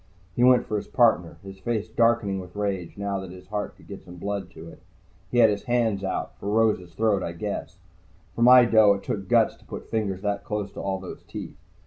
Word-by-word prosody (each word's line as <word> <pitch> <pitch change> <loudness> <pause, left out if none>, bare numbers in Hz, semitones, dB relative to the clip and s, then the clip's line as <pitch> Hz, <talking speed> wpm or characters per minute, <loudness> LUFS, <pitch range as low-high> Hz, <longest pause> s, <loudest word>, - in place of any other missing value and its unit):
He 120 - +2
went 125 0 +5
for 105 - -2
his - - -5
partner, 110 -9 +2
his 95 0 -10
face 110 +1 -2
darkening 115 -3 +1
with 90 0 -10
rage 100 -4 -3
now 100 -1 -2
that 95 -1 -8
his 90 +1 -13
heart 105 0 -4
could - - -18
get - - -9
some 90 - -12
blood 100 0 -4
to 80 - -12
it. - - -13 0.5
He 125 - -2
had 115 -3 +6
his 100 - -4
hands 115 -5 +1
out, 95 - -3
for 100 - -4
Rose's 105 -6 +1
throat, 105 -3 +2
I 85 - -4
guess. 100 +4 -5 0.6
For - - -4
my 125 +1 +8
dough 110 -3 +5
it 100 - -8
took 100 -2 -4
guts - - +3
to - - -23
put - - -9
fingers 100 -4 -2
that 100 -1 -1
close 105 -2 -4
to - - -7
all 95 -1 -2
those 95 - -9
teeth. - - -8
100 Hz, 230 wpm, -25 LUFS, 95-110 Hz, 0.6 s, my